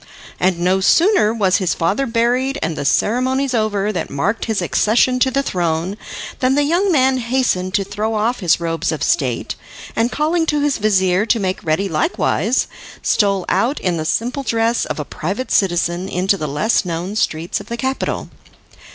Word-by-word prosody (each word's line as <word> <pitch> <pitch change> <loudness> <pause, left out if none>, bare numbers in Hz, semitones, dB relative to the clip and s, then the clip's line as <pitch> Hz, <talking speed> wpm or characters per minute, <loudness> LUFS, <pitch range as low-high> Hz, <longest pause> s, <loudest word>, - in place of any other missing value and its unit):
And 185 -1 +2
no 180 +2 +2
sooner 335 - +4
was 200 -5 +2
his 185 -3 0
father 200 +11 0
buried 245 +4 +1
and 165 0 -2
the - - -4
ceremonies 260 - +1
over 210 -3 0
that 180 - -3
marked 200 +11 -1
his 220 -3 -1
accession 245 +4 +2
to 260 - +3
the 275 +2 0
throne, 175 -2 -1 0.4
than 260 0 +2
the 290 - +3
young 350 +6 +2
man 265 -4 +3
hastened 235 -7 0
to 200 - +2
throw 210 +3 -3
off 225 +4 0
his 175 -4 +2
robes 165 -2 -1
of 155 -3 -3
state, 130 -7 0 0.4
and 230 +2 +1
calling 320 +2 0
to 300 -1 +1
his 290 -3 0
vizir 190 -1 +2
to 230 - +2
make 190 -2 -2
ready 165 +5 0
likewise, 190 +6 0 0.4
stole 200 -3 +2
out 235 +10 +1
in 180 -2 -1
the 155 - -3
simple 245 - -1
dress 230 -2 0
of - - -4
a 150 - -3
private 195 - -4
citizen 175 -1 +1
into 185 +3 +1
the 155 -5 -4
less 150 +13 +1
known 175 +3 -4
streets 165 -5 -1
of - - -11
the 235 - -4
capital. 265 +3 -2
210 Hz, 180 wpm, -18 LUFS, 180-255 Hz, 0.4 s, sooner